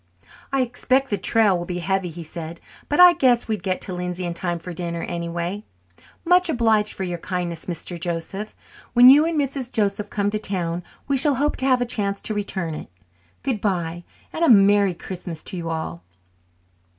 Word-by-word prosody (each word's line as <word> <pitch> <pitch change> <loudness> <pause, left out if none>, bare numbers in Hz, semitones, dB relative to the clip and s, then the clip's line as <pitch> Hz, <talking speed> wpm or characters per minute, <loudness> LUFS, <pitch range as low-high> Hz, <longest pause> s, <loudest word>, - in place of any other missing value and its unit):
"I 270 -1 +2
expect 260 +2 0
the 205 - +1
trail 220 -4 +3
will 175 0 -4
be 180 - -3
heavy," 190 0 -1
he 170 +1 -8
said, 165 +1 -7 0.3
"but 295 - 0
I 360 -1 +9
guess 250 -6 +2
we'd 215 -4 -2
get 185 0 -2
to 185 - -3
Lindsay 180 0 -4
in 170 - -3
time 175 0 -2
for 175 +1 -8
dinner, 170 0 -4
anyway. 170 +3 -4 0.6
Much 360 +1 +4
obliged 220 -6 +2
for 190 - -4
your 175 -2 -4
kindness, 175 -3 -4
Mr. 175 0 -5
Joseph. 175 +5 -4 0.4
When 245 +1 +9
you 295 +3 +6
and 330 -2 0
Mrs. 275 -3 -2
Joseph 205 -1 0
come 205 -1 -1
to 215 - -1
town 175 -4 -3 0.3
we 280 -1 +1
shall 285 +1 +6
hope 290 +4 0
to 260 - 0
have 255 -2 +3
a - - +1
chance 200 -4 -1
to 215 - -3
return 190 -5 -3
it. 155 - -8 0.5
Good 245 -7 -1
bye 175 -4 -2 0.3
and 330 - -2
a 330 - +4
merry 200 -3 +5
Christmas 175 -2 -8
to 185 - -4
you 165 -1 -4
all." 160 - -4
195 Hz, 195 wpm, -22 LUFS, 175-240 Hz, 0.6 s, I